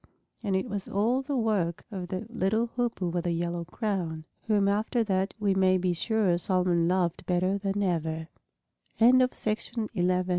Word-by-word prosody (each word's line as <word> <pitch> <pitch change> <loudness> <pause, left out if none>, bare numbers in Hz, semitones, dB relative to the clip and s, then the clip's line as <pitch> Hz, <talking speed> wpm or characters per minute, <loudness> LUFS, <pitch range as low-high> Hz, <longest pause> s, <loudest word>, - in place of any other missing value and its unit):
And 200 -4 -1
it 190 +5 0
was 205 -3 -4
all 230 +6 +1
the 280 +1 -3
work 205 -8 0
of 185 -3 -5
that 200 +6 -6
little 220 +4 +1
Hoopoe 235 -7 -1
with 175 0 -2
a - - +1
yellow 170 0 -2
crown, 175 -6 -3 0.2
whom 205 -2 +3
after 215 +4 +1
that 190 -2 -1
we 205 -2 +2
may 190 -1 +4
be 180 -1 0
sure 190 -1 +1
Solomon 180 -2 +2
loved 180 -1 0
better 185 +2 +1
than 200 +1 -1
eve 160 -2 -1
190 Hz, 150 wpm, -28 LUFS, 175-210 Hz, 0.2 s, may